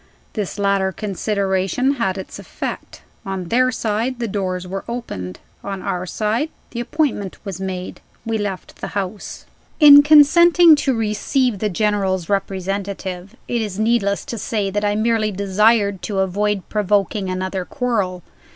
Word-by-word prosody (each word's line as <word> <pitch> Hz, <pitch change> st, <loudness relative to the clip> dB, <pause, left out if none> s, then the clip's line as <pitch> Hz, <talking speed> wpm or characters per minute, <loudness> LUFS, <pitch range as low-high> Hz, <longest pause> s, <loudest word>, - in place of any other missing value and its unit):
This 210 Hz, -3 st, -4 dB
latter 200 Hz, -1 st, +1 dB
consideration 200 Hz, +5 st, -1 dB
had 190 Hz, -2 st, 0 dB
its 190 Hz, -, -8 dB
effect. -, -, -7 dB, 0.2 s
On 190 Hz, -4 st, -5 dB
their 255 Hz, +2 st, +3 dB
side, 230 Hz, +2 st, -2 dB
the 235 Hz, -1 st, -2 dB
doors 185 Hz, -3 st, -3 dB
were 195 Hz, +1 st, -5 dB
opened. 95 Hz, -, -5 dB, 0.3 s
On 195 Hz, -2 st, -5 dB
our 180 Hz, 0 st, -3 dB
side, 220 Hz, -, -1 dB, 0.2 s
the 235 Hz, -, -5 dB
appointment 240 Hz, -, -1 dB
was 195 Hz, -2 st, -6 dB
made. 185 Hz, -1 st, -5 dB, 0.2 s
We 225 Hz, -1 st, -1 dB
left 200 Hz, -3 st, -5 dB
the -, -, -5 dB
house. 195 Hz, +1 st, -5 dB, 0.3 s
IV. 300 Hz, -, +7 dB
IN 285 Hz, 0 st, +11 dB
consenting 320 Hz, +3 st, +7 dB
to 270 Hz, -3 st, 0 dB
receive 225 Hz, +2 st, 0 dB
the 210 Hz, -, 0 dB
General's 195 Hz, -3 st, 0 dB
representative, 195 Hz, -1 st, -3 dB
it 240 Hz, -1 st, -1 dB
is 205 Hz, -3 st, -4 dB
needless 215 Hz, -2 st, +1 dB
to 230 Hz, -, -5 dB
say 200 Hz, -2 st, -2 dB
that 205 Hz, +1 st, -1 dB
I 205 Hz, 0 st, +1 dB
merely 215 Hz, -1 st, +1 dB
desired 200 Hz, 0 st, +2 dB
to 205 Hz, -, -4 dB
avoid 200 Hz, +1 st, -1 dB
provoking 205 Hz, -1 st, 0 dB
another 185 Hz, 0 st, -3 dB
quarrel. 200 Hz, -, -2 dB
205 Hz, 150 wpm, -20 LUFS, 190-230 Hz, 0.3 s, IN